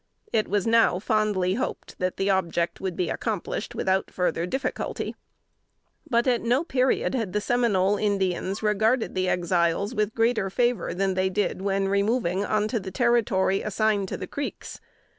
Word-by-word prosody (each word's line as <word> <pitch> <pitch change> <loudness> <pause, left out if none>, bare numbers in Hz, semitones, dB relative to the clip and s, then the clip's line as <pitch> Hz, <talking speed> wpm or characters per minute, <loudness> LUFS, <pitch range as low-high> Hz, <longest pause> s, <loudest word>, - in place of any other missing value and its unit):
It 215 - +2
was 205 -1 0
now 230 -5 +4
fondly 205 -2 +1
hoped, 255 +6 -4
that 185 0 -1
that 195 - 0
object 175 -3 0
would 190 -2 -3
be 180 - -1
accomplished 215 -6 -3
without 190 0 0
further 180 -1 -1
difficulty. 265 +5 -3 0.9
But 235 -1 +2
at 245 -3 +2
no 245 +6 +2
period 260 -6 +1
had 225 -8 -2
the 210 - +1
Seminole 205 -4 +2
Indians 195 -1 -1
regarded 220 +3 +1
the 185 0 0
Exiles 175 +4 +1
with 210 -2 -1
greater 225 -3 +1
favor 240 -1 0
than 195 +1 +1
they 185 0 +1
did 200 0 -1
when 195 0 0
removing 200 -1 +1
on 215 0 +1
to 230 - 0
the 190 -1 -6
territory 210 -5 +2
assigned 215 -1 0
to - - -4
the 185 - -5
Creeks. 285 +9 -6
205 Hz, 160 wpm, -25 LUFS, 190-230 Hz, 0.9 s, now